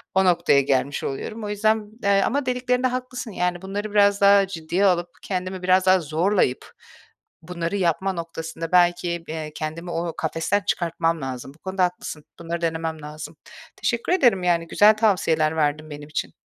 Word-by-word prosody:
O 190 0 +4
noktaya 170 -6 +4
gelmiş 135 +1 0
oluyorum. 215 +11 -5
O 210 - -4
yüzden, 215 0 0
eee, 200 0 +4
ama 280 +7 0
dediklerinde 250 0 0
haklısın, 250 -1 -5
yani, 180 -2 -1
bunları 205 +2 -4
biraz 200 -1 +4
daha 200 0 +6
ciddiye 175 +1 -1
alıp, 175 -2 +2
kendimi 185 -1 -4
biraz 185 0 +3
daha 185 0 +5
zorlayıp 160 -2 0 0.7
bunları 170 +2 -4
yapma 190 +1 0
noktasında 165 -1 -6
belki, 175 -1 +2
eee, 155 -1 -5
kendimi 165 +3 -5
o 170 0 -2
kafesten 165 +5 0
çıkartmam 165 -1 0
lazım. 130 0 -6
Bu - - -25
konuda 190 +1 -1
haklısın. 175 -4 -3 0.2
Bunları 170 0 -4
denemem 160 -1 -2
lazım. 150 +1 -8 0.4
Teşekkür 235 +8 -1
ederim, 240 - +3
yani 170 -1 +1
güzel 210 +5 +5
tavsiyeler 165 -8 +2
verdin 155 0 0
benim 145 0 -9
için. 155 - -3
175 Hz, 160 wpm, -23 LUFS, 160-200 Hz, 0.7 s, daha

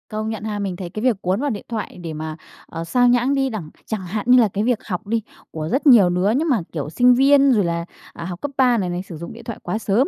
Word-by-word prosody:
Công 215 0 -3
nhận 220 -2 -5
ha. 210 -1 -3
Mình 195 -3 -3
thấy 175 -1 -6
cái 215 +5 -6
việc 235 -6 +1
cuốn 185 +3 0
vào 290 - 0
điện 210 -6 -5
thoại 220 -5 -5
để 165 -2 -5
mà, 155 0 -5 0.3
ờ, 165 0 -6
xao 245 +8 +2
nhãng 245 +2 +3
đi 270 -1 +1
đẳng 205 -10 -6 0.2
chẳng 220 -3 -3
hạn 205 +4 -4
như 250 0 +8
là 230 - +5
cái 205 +1 -2
việc 240 -1 +1
học 200 +1 -4
đi 225 +1 0 0.3
của 155 0 -4
rất 280 +4 +1
nhiều 220 -9 +7
đứa, 180 +3 +1
nhưng 315 +4 0
mà, 240 -8 +2
kiểu, 145 -3 -4
sinh 245 +9 +4
viên, 275 +1 +5
rồi 215 -5 +3
là, 170 0 -2 0.3
à, 170 - -7
học 175 0 -6
cấp 285 - -3
3 250 -2 +4
này 185 -4 -1
này, 175 0 -3
sử 175 -4 -9
dụng 170 +2 -8
điện 235 +1 -12
thoại 230 -2 -7
quá - - -2
sớm, 220 +5 +1
215 Hz, 290 wpm, -21 LUFS, 180-245 Hz, 0.3 s, như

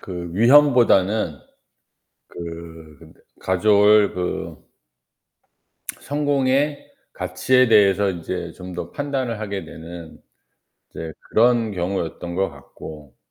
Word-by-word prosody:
그 90 -2 -7
위험보다는 115 - +4 0.9
그 80 -2 -10 0.3
가져올 105 +2 +4
그 90 -1 -5 1.4
성공의 145 0 0 0.2
가치에 130 -1 +1
대해서 100 -2 +4
인제 85 0 -5
좀 90 0 -10
더 85 0 -6
판단을 135 -5 -3
하게 100 -2 -4
되는 85 0 -11 0.7
이제 80 -1 -7 0.2
그런 115 -1 +3
경우였던 90 -2 -4
것 95 +1 0
같고. 75 0 -12
95 Hz, 190 characters per minute, -21 LUFS, 85-120 Hz, 1.4 s, 위험보다는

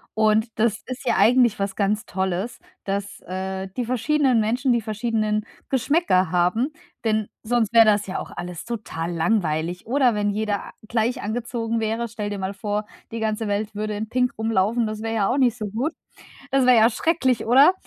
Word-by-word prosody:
und 215 +1 +3
das 220 -1 +1
ist 255 +1 -6
ja - - +2
eigentlich 235 +1 +4
was 195 -1 -2
ganz 210 +3 0
Tolles, 190 +4 -2 0.3
dass, 200 0 -3
äh, 190 +1 -4
die 245 - 0
verschiedenen 255 0 +2
Menschen, 245 +4 +1
die 235 - +1
verschiedenen 215 -1 -1 0.2
Geschmäcker 260 - +2
haben, 185 - +1 0.3
denn 215 -2 +1 0.2
sonst 230 -1 +1
wäre 225 -1 +8
das 205 -2 +3
ja 185 - -3
auch - - -6
alles 175 -1 -6
total 205 -8 -4
langweilig 170 -2 0
oder 250 -2 +2
wenn 205 0 +1
jeder, 210 0 -1 0.3
äh, 215 - -17
gleich 230 +2 0
angezogen 230 +1 -2
wäre, 225 +2 -1
stelle 210 -2 -5
dir 200 - -4
mal 190 +1 -3
vor, 210 0 -3 0.2
die 230 - -4
ganze 220 0 -1
Welt 205 +1 -2
würde 210 0 -2
in 215 +1 -4
pink 250 0 +1
rumlaufen, 220 +1 +1
das 215 +1 -5
wäre 225 - -2
ja 210 -3 +1
auch 265 - +1
nicht 245 -4 +3
so 215 -3 -4
gut. 245 +10 -2 0.6
Das 270 -1 +3
wäre 250 -2 +7
ja 225 +1 +6
schrecklich, 260 -5 +1
oder? 275 +9 +7
220 Hz, 190 wpm, -23 LUFS, 205-240 Hz, 0.6 s, wäre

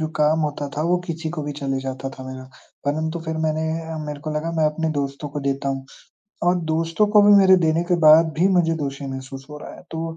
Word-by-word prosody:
जो 155 - 0
काम 150 +1 +3
होता 145 -1 -2
था, 150 - 0
वो 175 +2 +2
किसी 165 -1 -4
को 155 - -4
भी 145 0 -4
चले 135 -1 -2
जाता 135 0 -5
था 130 - -10
मेरा, 130 0 -8 0.4
परंतु 160 +3 -1
फिर 160 0 -2
मैंने 155 0 0 0.3
अ, 160 - -5
मेरे 150 -1 -6
को 155 +1 -5
लगा 160 +2 -2
मैं 160 -1 +1
अपने 160 +1 -1
दोस्तों 140 +1 -4
को 145 +1 -5
देता 140 0 -1
हूँ 135 0 -3 0.6
और 180 - +3 0.2
दोस्तों 165 +6 +1
को 210 - +8
भी 205 0 +7
मेरे 190 -1 +7
देने 160 +2 +2
के 175 - +4
बाद 160 +1 +7
भी 185 +3 +4
मुझे 165 -2 +3
दोषी 140 0 -4
महसूस 135 0 -8
हो 150 - -8
रहा - - -9
है, - - -14
तो 165 0 -4
155 Hz, 240 wpm, -22 LUFS, 140-165 Hz, 0.6 s, को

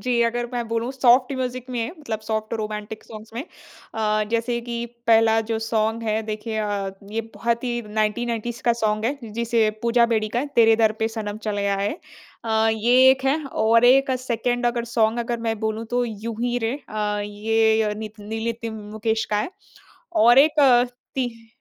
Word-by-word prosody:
जी, 245 -1 +2
अगर 240 +1 -2
मैं 240 -1 -2
बोलूँ 230 +2 -1
सॉफ़्ट 255 0 +4
म्यूज़िक 255 0 -4
में 235 -2 -2
मतलब 220 -8 -4
सॉफ़्ट 220 0 -3
रोमांटिक 215 -1 -5
सॉन्ग्स 215 0 -11
में 240 - -3 0.5
अ, 215 -1 +1
जैसे 235 +1 0
कि 235 0 -4 0.2
पहला 225 0 +5
जो 225 - 0
सॉन्ग 225 0 -1
है 220 0 0
देखिए 220 +1 -4
अ, 205 -2 -2 0.2
ये 225 - 0
बहुत 235 +1 -1
ही 245 - -1
1990s 225 +3 -2
का 240 - +3
सॉन्ग 215 0 +1
है 270 +5 0 0.2
जिसे 230 -1 +1
पूजा 235 0 +4
बेदी 215 -1 +1
का 235 - -2
है, 290 - -3
तेरे 225 -1 +6
दर 220 -1 +4
पे 220 - +2
सनम 215 -2 -5
चले 205 -1 -1
आए। 200 +1 0 0.5
अ, 220 0 +2
ये 230 +3 +2
एक 265 0 0
है 275 +3 +2 0.3
और 230 +2 +5
एक 270 +2 +5
सेकंड 245 0 -1
अगर 240 -1 0
सॉन्ग 225 0 +2
अगर 235 0 -2
मैं 225 -1 -1
बोलूँ 220 0 -2
तो, 245 0 +1
यूँ 225 0 -5
ही 245 0 0
रे। 225 +2 -1
अ, 210 -1 -2
ये 220 +1 +2
य 210 -1 -1
नित 215 0 -8
नील 220 +2 -5
नितिन 230 -1 -3 0.2
मुकेश 220 +1 -1
का 210 - +2
है। 210 - -1 0.7
और 240 +1 +6
एक 300 +2 +5
अ 250 -3 +6 0.3
तिह 235 -3 -3
225 Hz, 190 wpm, -23 LUFS, 215-240 Hz, 0.7 s, तेरे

